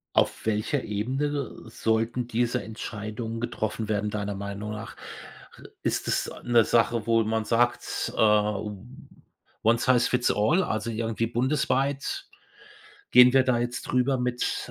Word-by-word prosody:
Auf - - +1
welcher 110 +6 0
Ebene 135 +6 -2
sollten 115 +2 -1
diese 120 +1 0
Entscheidungen 110 +1 -5
getroffen 110 -2 -3
werden 105 0 0
deiner 105 -1 -3
Meinung 100 +1 -5
nach? 110 +1 -7 0.9
Ist - - -1
es - - 0
'ne 120 -1 +4
Sache, 115 -1 +2
wo 115 -1 +4
man 110 0 -1
sagt, 120 +2 0
ähm, 105 +1 0 0.6
one 115 +1 +4
size 125 -1 +3
fits 125 -1 +2
all, 155 - +2
also 110 - -2
irgendwie 115 0 -1
bundesweit, 135 - 0 0.8
gehen 125 0 +8
wir 135 -1 +5
da 130 -2 +2
jetzt 120 +1 -3
drüber 130 +1 +1
mit, 125 0 -2
115 Hz, 130 wpm, -26 LUFS, 110-125 Hz, 0.9 s, gehen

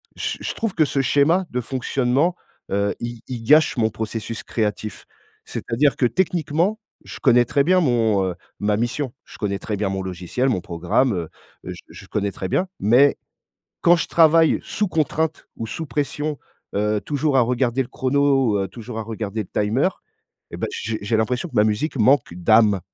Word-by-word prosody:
je - - -3
je - - -3
trouve 225 -4 -2
que 160 - +3
ce 140 -1 0
schéma 150 +7 +3
de 125 - -1
fonctionnement, 130 +6 0 0.4
heu, 100 +1 +1
il 120 -1 -6
il 120 -3 -5
gâche 150 +5 +4
mon 110 -2 +2
processus 110 0 -5
créatif. 105 -1 -3 0.4
C'est-à-dire 135 +5 0
que 125 - +1
techniquement, 175 - 0 0.3
je - - -9
connais 120 -3 +5
très 140 +4 +2
bien 185 +4 +4
mon 115 - +2
heu, 90 -2 -3 0.2
ma 105 0 +1
mission. 120 +4 -2
Je - - -14
connais 100 -2 -2
très 105 -1 -4
bien 100 0 -1
mon 95 0 -2
logiciel, 95 +8 -2
mon 105 - +1
programme, 90 +9 0
heu, 85 -4 -3 0.3
je - - -7
je - - -12
connais 100 -1 -1
très 95 - -5
bien, 185 - +1
mais 125 +7 +5 0.7
quand 175 +1 +5
je 165 - -2
travaille 165 -1 +4
sous 210 - -1
contrainte 160 -2 -1
ou 115 - -4
sous 160 +8 -5
pression, 145 0 -2 0.4
heu, 105 +1 +1
toujours 145 +1 0
à - - +6
regarder 125 +1 +1
le 125 - -10
chrono, 135 -5 +2
ou - - -3
toujours 115 +2 -8
à - - -2
regarder 110 -1 -4
le - - -20
timer 115 - +2 0.6
et - - -7
bah, - - -1
j'ai 110 0 -3
j'ai 110 +2 0
l'impression 125 +8 -1
que - - -17
ma 105 - +5
musique 110 +9 -1
manque 125 -4 +3
d'âme. 105 +2 +4
120 Hz, 185 wpm, -22 LUFS, 105-145 Hz, 0.7 s, à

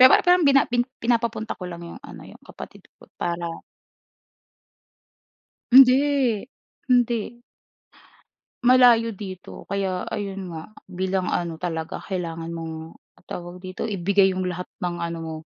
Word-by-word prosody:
Pero 255 - +11 0.2
parang 355 -1 +5
bina 275 0 +5
pi 240 0 0 0.2
pinapapunta 230 -2 0
ko 180 - -5
lang 170 0 -8
yung 170 - -10
ano, 285 - -11
yung - - -14
kapatid - - -12
ko - - -17 0.2
para 170 -1 -3 2.1
Hindi, 260 -3 +5 0.4
hindi. 240 -1 +1 1.2
Malayo 245 -2 +6
dito 190 -2 -9
kaya 190 -2 -2
ayun 195 -2 -4
nga, 165 +5 -8 0.2
bilang 185 0 -1
ano 170 -2 -2
talaga 165 -2 -4
kailangan 165 -3 -4
mong 160 0 -7 0.3
tawag 175 +1 -7
dito? 185 0 -6
Ibigay 195 0 +2
yung 185 0 -2
lahat 180 0 -5
ng 175 -1 -2
ano 170 0 -3
mo. 160 -1 -5
190 Hz, 130 wpm, -24 LUFS, 175-235 Hz, 2.1 s, Pero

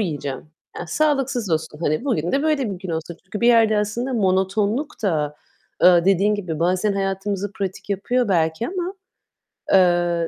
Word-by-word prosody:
yiyeceğim. 145 -8 -4 0.3
Ya, 175 - -6
sağlıksız 270 - 0
olsun. 160 -1 -2
Hani, 155 - 0
bugün 190 - -1
de 280 +2 +1
böyle 285 -8 +1
bir 185 - -5
gün 190 -1 -6
olsun." 160 +1 -4
Çünkü 205 +2 -6
bir 235 - +4
yerde 225 -3 +5
aslında 235 +5 -2
monotonluk 205 +6 0
da, 150 -7 -1 0.5
eee, 175 -1 +6
dediğin 195 +2 +3
gibi 180 -7 -4
bazen 185 +4 +1
hayatımızı 195 +1 -2
pratik 195 -1 -5
yapıyor 235 +4 0
belki 165 +3 +1
ama, 370 0 -4 0.8
eee, 175 -2 +3
195 Hz, 160 wpm, -22 LUFS, 175-230 Hz, 0.8 s, eee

